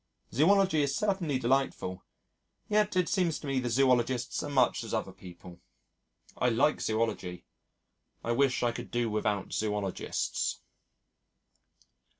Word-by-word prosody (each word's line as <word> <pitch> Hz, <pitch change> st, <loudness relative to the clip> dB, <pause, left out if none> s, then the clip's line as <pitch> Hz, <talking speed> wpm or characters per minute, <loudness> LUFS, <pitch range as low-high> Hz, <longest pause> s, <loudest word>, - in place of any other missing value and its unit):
Zoology 185 Hz, -, +4 dB
is 140 Hz, -1 st, 0 dB
certainly 190 Hz, -8 st, 0 dB
delightful, 125 Hz, -7 st, -1 dB, 0.6 s
yet 210 Hz, -1 st, +2 dB
it 180 Hz, -2 st, +2 dB
seems 180 Hz, -5 st, +1 dB
to -, -, -10 dB
me 135 Hz, -2 st, 0 dB
the 125 Hz, -1 st, -2 dB
Zoologists 125 Hz, -1 st, +2 dB
are -, -, -5 dB
much 130 Hz, -4 st, +2 dB
as 115 Hz, -, -3 dB
other 110 Hz, -3 st, -2 dB
people. 90 Hz, -2 st, -13 dB, 0.7 s
I 125 Hz, -, +2 dB
like 120 Hz, +6 st, +2 dB
Zoology. 110 Hz, -5 st, -2 dB, 0.8 s
I 115 Hz, -, -1 dB
wish 130 Hz, +1 st, +2 dB
I 120 Hz, -, +2 dB
could -, -, -7 dB
do 120 Hz, -2 st, -1 dB
without 105 Hz, -2 st, -1 dB
Zoologists.... 105 Hz, -3 st, -2 dB
125 Hz, 130 wpm, -30 LUFS, 110-145 Hz, 0.8 s, Zoology